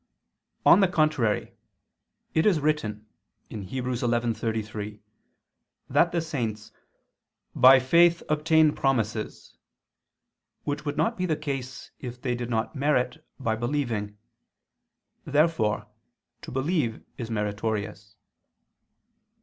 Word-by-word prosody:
On - - +8
the 195 - +5
contrary, 155 -10 +1 0.8
It 160 +5 +3
is 185 -7 +4
written 125 -9 -1 0.5
(Heb. 110 - -5 0.3
11:33) 115 -4 -2 0.9
that 170 - +4
the 170 - 0
saints 115 -10 -4 0.8
"by 130 +1 +8
faith... 170 +6 +4
obtained 155 0 +3
promises," 115 -5 -1 1.1
which 145 +1 -3
would 145 0 -3
not 230 +1 +1
be 185 0 -1
the 155 - +1
case 135 -4 -5
if 125 -1 -7
they 125 -1 -1
did 120 0 -4
not 115 +4 -1
merit 130 -3 0 0.2
by 115 -4 0
believing. 115 -4 -2 1.1
Therefore 145 -8 +1 0.6
to - - -9
believe 135 -3 -1 0.2
is 115 -2 -4
meritorious. 105 -1 -3
125 Hz, 100 wpm, -26 LUFS, 110-150 Hz, 1.1 s, On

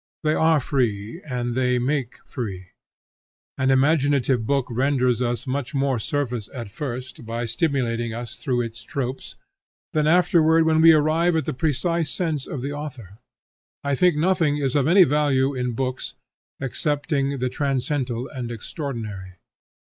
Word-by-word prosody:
They 155 0 +2
are 160 -1 +4
free, 120 - -1
and 120 -1 -2
they 125 0 +1
make 130 0 -2
free. 95 -7 -6 0.9
An 130 -1 0
imaginative 135 -4 +2
book 140 -2 +1
renders 125 -1 +1
us 120 +1 -1
much 140 +1 -3
more 135 -3 +1
service 125 -3 -2
at 115 -5 -6
first, 130 +1 -6
by 115 +1 -3
stimulating 120 -2 0
us 120 +1 -6
through 125 -5 0
its 115 0 -6
tropes, 130 +1 -5 0.6
than 155 -1 +2
afterward 165 -1 +4
when 160 0 +3
we 165 0 +9
arrive 160 +3 +3
at 160 -4 0
the - - -2
precise 160 +4 0
sense 150 0 -2
of 130 -4 -5
the 140 - -3
author. 125 -9 -8 0.6
I 140 0 0
think 175 +4 +3
nothing 165 -2 +2
is 135 -2 -1
of 140 -1 +3
any 185 +3 +7
value 140 -3 +2
in 125 -2 -2
books 130 +1 -3 0.4
excepting 140 +1 -1
the 130 0 -1
transcendental 130 -2 -1
and 125 -3 -6
extraordinary. 110 - -6
135 Hz, 150 wpm, -23 LUFS, 120-150 Hz, 0.9 s, we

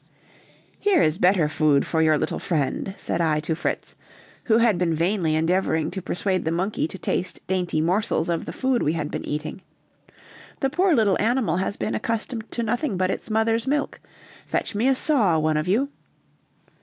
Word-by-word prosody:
"Here 400 -4 +3
is 155 - +2
better 180 -3 +4
food 150 -2 +2
for 160 - 0
your 155 -1 +4
little - - -2
friend," 165 +4 -2
said 170 - -2
I 155 -2 +2
to 160 +1 -1
Fritz, 170 - -3 0.5
who 220 -2 +4
had 230 -6 +3
been 170 -3 +1
vainly 170 -1 +1
endeavoring 160 -1 +1
to 190 +1 -5
persuade 185 +1 -1
the 160 - -1
monkey 185 +2 -1
to 190 - -8
taste 180 -1 -2
dainty 180 -4 0
morsels 180 +1 +1
of 170 -1 -1
the - - -3
food 260 -2 0
we 150 - +1
had 155 -3 -3
been - - -4
eating; 150 +5 -4 1.0
"the 270 -2 0
poor 355 +2 +3
little 210 -6 +3
animal 235 -2 +1
has 190 +2 -2
been - - -2
accustomed 230 0 -3
to 235 - -2
nothing 240 0 -1
but 185 0 +1
its - - -5
mother's 225 +2 +1
milk; 290 +1 -1 0.5
fetch - - -2
me 215 +5 +1
a 270 - +4
saw, 230 - +2
one 155 0 +1
of 155 +2 -1
you." 230 +9 +2
185 Hz, 185 wpm, -24 LUFS, 160-230 Hz, 1.0 s, better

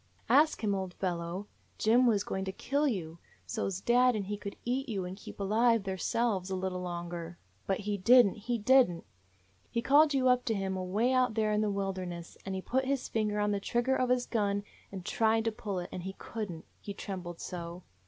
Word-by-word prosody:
"Ask 300 -3 +4
Him, 205 -2 +2
old 190 -2 -3
fellow, 175 +1 -3 0.3
Jim 240 +3 +4
was 210 -4 +3
going 190 - -3
to 190 - -2
kill 280 +9 0
you, 170 - -3 0.3
so 220 -4 -2
's 190 -1 -4
dad 245 +2 +4
and 205 -2 -2
he 205 +2 -3
could 200 -1 -7
eat 260 +3 -1
you 195 -5 -2
and 180 +1 -6
keep 200 - -11
alive 225 +2 +3
theirselves 195 +1 -1
a 190 - -1
little 185 -1 -2
longer.* 175 -1 -5 0.3
But 195 0 0
he 205 0 -2
did 245 +5 +7
n't; 200 - -2
he 235 +3 -2
did 255 +1 +5
n't! 170 -1 -8 0.6
He 235 -1 -2
called 290 +1 +5
you 260 -1 +3
up 250 0 +4
to 225 -3 +1
him 195 -1 -2
away 200 +7 0
out 255 -3 +2
there 215 -1 +1
in 210 0 +2
the 215 - +1
wilderness, 185 -3 -4
and 190 - -2
he 190 - -4
put 260 +1 0
his 270 -1 -1
finger 210 -2 0
on 210 0 +1
the 200 - 0
trigger 240 +6 +1
of 255 -1 +1
his 250 -1 +2
gun, 205 -3 0 0.3
and 190 -3 -7
tried 225 0 +2
to 225 - +2
pull 205 -3 -4
it; 175 0 -4
and 180 - -5
he 190 +2 -5
could 220 -3 -5
n't, 165 -1 -9
he 200 - -7
trembled 180 -4 -6
so. 175 0 -6
205 Hz, 220 wpm, -31 LUFS, 185-240 Hz, 0.6 s, did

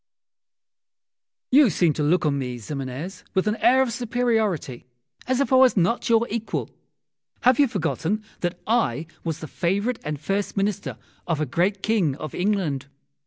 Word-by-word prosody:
You 275 -1 +7
seem 170 -2 +2
to 150 - -3
look 165 +4 +2
on 140 -2 +1
me, 125 -2 -4
Ximenes, 140 - -6
with 190 - +2
an 210 0 +1
air 260 +2 +5
of 240 -3 -3
superiority, 220 - -1 0.4
as 260 0 +1
if 280 -1 +1
I - - +7
was 255 -3 +5
not 190 +8 +1
your 230 0 +4
equal. 225 0 -3 0.7
Have 250 +1 +4
you 285 - +6
forgotten 200 +1 -2 0.2
that 175 0 -2
I 190 - +1 0.2
was 165 -2 -3
the 155 - -6
favourite 200 - -1
and 150 -2 -4
first 195 +7 -2
Minister 200 0 -1 0.3
of 165 -3 0
a 155 - +1
great 185 +8 0
King 195 -11 +1
of 155 0 -7
England? 180 -9 -1
190 Hz, 165 wpm, -24 LUFS, 155-230 Hz, 0.7 s, You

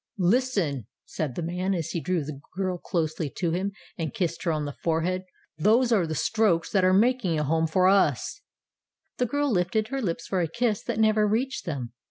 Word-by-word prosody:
"Listen," 185 - +1 0.2
said 145 -6 -4
the 175 - -3
man, 180 +3 -1
as 165 -2 -3
he 170 - -1
drew 180 -3 0
the 140 -1 -7 0.2
girl 185 -2 -1
closely 160 -4 -2
to 170 -3 0
him 190 +4 -1 0.3
and 165 +7 -3
kissed 175 -6 -1
her 170 - 0
on 155 -2 -1
the 145 - -5
forehead; 175 +3 0 0.3
"those 235 +8 +4
are 195 -7 +3
the 155 - -3
strokes 185 -1 +1
that 190 -2 +3
are 185 - +5
making 210 -4 +3
a 150 - +1
home 160 +2 +1
for 185 +3 +3
us." 195 +1 +2 0.8
The 250 - +1
girl 285 +3 0
lifted 210 +3 +1
her 270 0 -2
lips 165 -6 -2
for 185 -2 0
a 170 - +1
kiss 225 +4 0
that 235 -3 -2
never 215 -1 +4
reached 250 +6 -1
them. 130 -7 -4
185 Hz, 205 wpm, -26 LUFS, 165-215 Hz, 0.8 s, are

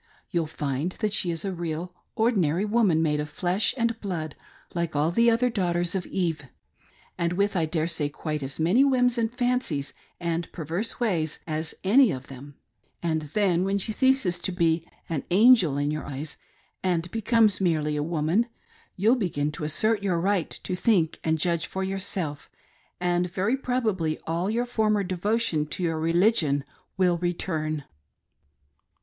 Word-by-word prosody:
You'll 170 -4 0
find 150 +3 -2
that 215 -2 -2
she 195 -4 +2
is 165 +2 -2
a 195 - -2
real 170 +1 -4 0.2
ordinary 195 -6 +2
woman, 205 -7 +3
made 150 -2 +1
of 150 0 -3
flesh 180 +6 +1
and 230 -1 0
blood,, 165 -7 -4 0.4
like 170 -3 -2
all 150 +3 +2
the 230 +6 +4
other 240 +2 +2
daughters 175 -5 0
of 190 -2 -2
Eve, 165 -6 -2 0.7
and 170 0 +1
with, 200 +2 +1
I 165 -3 +1
daresay, 160 -2 -1
quite 150 0 -4
als 135 +1 -5
many 180 +12 +4
whims, 250 -3 +3
and 225 0 0
fancies, 245 - -1 0.3
and 170 -1 -2
perverse 170 +7 -4
ways 170 -10 0
as 160 0 -3
any 230 +4 +5
ot 130 -1 -5
tliem; 140 +2 -10 0.5
and 160 -3 -1
then, 185 -4 +3
whert 195 +1 0
she 220 - -2
ceases 260 -8 +2
to 185 - -2
be 170 -2 +1 0.2
'an 160 -4 -2
angel' 190 - +6
in 145 +1 0
your 155 0 -4
eyes,, 145 +2 -5 0.5
ahd 175 -2 0
becomes 225 -2 +3
merely 155 -4 +1
a 150 - 0
womaai^ 165 +7 +1 0.5
you'll 220 +7 +4
begin 150 - -1
to 150 - -7
assert 210 +8 +1
your 185 -4 0
right 190 -1 +1
to 185 - -2
think 180 -4 +2
and 160 0 +1
judge 170 0 0
for 190 - -3
yourself, 190 -6 -3 0.5
and 175 0 0
very 195 +7 +1
probably 220 -12 -1
all 170 +4 -1
your 235 +3 0
former 215 -4 +1
devotion 185 -3 0
to 180 - -3
your 165 -2 0
religion 165 -4 +2 0.3
will 180 -2 +2
return." 160 -4 -2
175 Hz, 165 wpm, -26 LUFS, 160-210 Hz, 0.7 s, angel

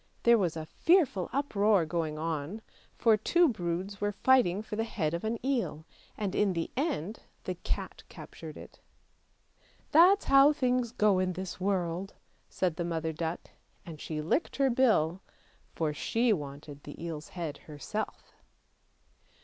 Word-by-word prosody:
There 235 -1 +6
was 175 -4 0
a 155 - -5
fearful 290 - +2
uproar 210 - +2
going 155 -1 -2
on, 160 +6 -3 0.3
for 225 -2 +5
two 345 - +3
broods 190 - -3
were 205 0 +1
fighting 210 -4 +3
for 215 - -6
the 225 - 0
head 170 -9 -2
of 170 - -3
an 220 +1 -1
eel, 235 - -1 0.3
and 200 -3 -2
in 205 -2 +2
the 165 -1 -3
end 230 - -2 0.2
the - - -3
cat - - -5
captured - - -10
it. - - -12 0.6
" - - -35
That's 365 +6 +6
how 275 +2 +6
things 250 -4 0
go 210 -5 +3
in 185 0 0
this 185 +1 -6
world," 185 -1 -1 0.3
said 180 -4 -1
the 175 - -1
mother 165 -1 -2
duck, 165 +2 -4 0.3
and 160 -3 -9
she 155 -1 -4
licked 235 - 0
her 270 -2 +2
bill, 200 -9 +2 0.5
for 155 -2 -1
she 230 +9 +1
wanted 145 -2 -7
the 145 - -10
eel's 160 -2 -6
head 160 -4 -4
herself. 155 +9 -5
190 Hz, 155 wpm, -30 LUFS, 165-235 Hz, 0.6 s, There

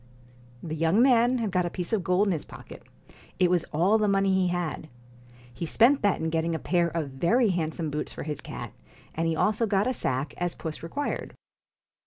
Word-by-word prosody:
The 160 -2 -4
young 165 +6 +2
man 250 -1 +4
had 225 -4 -2
got 180 -1 +1
a - - -3
piece 180 +3 -4
of 205 -5 +1
gold 185 +4 +2
in - - +2
his 160 -4 -2
pocket; - - -12 0.6
it 180 -1 +3
was 180 -2 +2
all 185 +8 +2
the 210 - +2
money 195 -1 +2
he 190 -1 +2
had. 175 -3 -3 0.6
He 120 - -6
spent 245 - +4
that 205 -2 +2
in 160 0 -2
getting 165 0 0
a - - 0
pair 175 +1 +1
of 160 -4 -3
very 205 - +2
handsome 160 -2 -2
boots 150 - -3
for - - -7
his 150 -1 -4
cat, - - -7 0.4
and 165 +1 -1
he 165 - 0
also 215 +6 +1
got 200 0 +2
a 255 - 0
sack, 135 - -2
as 175 -1 -2
puss 160 -2 -6
required. 225 - -4
175 Hz, 210 wpm, -27 LUFS, 160-205 Hz, 0.6 s, man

